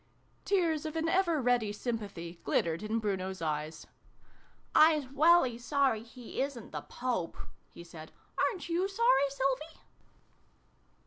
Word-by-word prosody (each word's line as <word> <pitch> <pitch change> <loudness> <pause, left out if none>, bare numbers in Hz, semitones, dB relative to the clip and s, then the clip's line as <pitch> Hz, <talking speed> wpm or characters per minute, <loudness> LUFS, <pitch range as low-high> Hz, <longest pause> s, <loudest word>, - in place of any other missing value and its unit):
Tears 330 -6 +1
of 310 - -6
an 325 0 0
ever 340 -2 +2
ready 245 -4 +2
sympathy 205 -7 -5
glittered 165 +1 0
in 215 +1 -1
Bruno's 190 -3 -2
eyes. 155 -1 -3 0.5
" - - -33
Ps 310 -2 +6
welly 290 -5 +4
sorry 265 -3 +1
he 240 +2 -7
isn't 270 -5 -4
the - - -4
Pope! 240 -9 -3 0.2
" - - -38
he 170 - -9
said. 160 -2 -11 0.2
" - - -38
Aren't 375 -8 -7
you 350 +3 +1
sorry, 390 - +3
Sylvie 275 +3 -2
255 Hz, 140 wpm, -31 LUFS, 200-315 Hz, 0.5 s, Ps